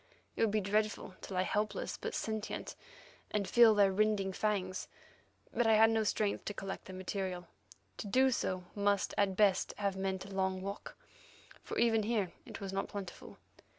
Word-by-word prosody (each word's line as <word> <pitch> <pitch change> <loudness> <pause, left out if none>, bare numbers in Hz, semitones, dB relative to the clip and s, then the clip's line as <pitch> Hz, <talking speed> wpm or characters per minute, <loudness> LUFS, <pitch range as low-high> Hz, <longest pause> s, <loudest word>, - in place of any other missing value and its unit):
It - - -3
would 225 - +4
be 210 +1 +1
dreadful 210 0 0
to - - -7
lie 185 - +2
helpless 210 +3 -1
but - - -5
sentient, 220 -1 -3 0.5
and 200 -2 -1
feel 235 -2 +7
their 200 -1 +5
rending 200 -1 +1
fangs. 185 -3 -1 0.7
But 240 - +2
I 220 - +6
had 225 +1 +6
no 225 -1 +2
strength 210 -1 0
to 205 - -4
collect 195 0 -5
the 190 - -9
material. 185 -1 -3 0.5
To - - -5
do 260 +6 +4
so 185 -6 -1
at 200 -1 +1
best - - -23
must 200 -3 +3
have 200 -2 0
meant 190 0 -2
a 195 - -9
long 190 -1 0
walk, 200 +1 -6 0.6
for - - -6
even 225 -2 +4
here 210 -4 0 0.2
it - - -8
was 195 -1 -5
not 195 - -1
plentiful. 195 -3 -8
200 Hz, 180 wpm, -34 LUFS, 190-215 Hz, 0.7 s, feel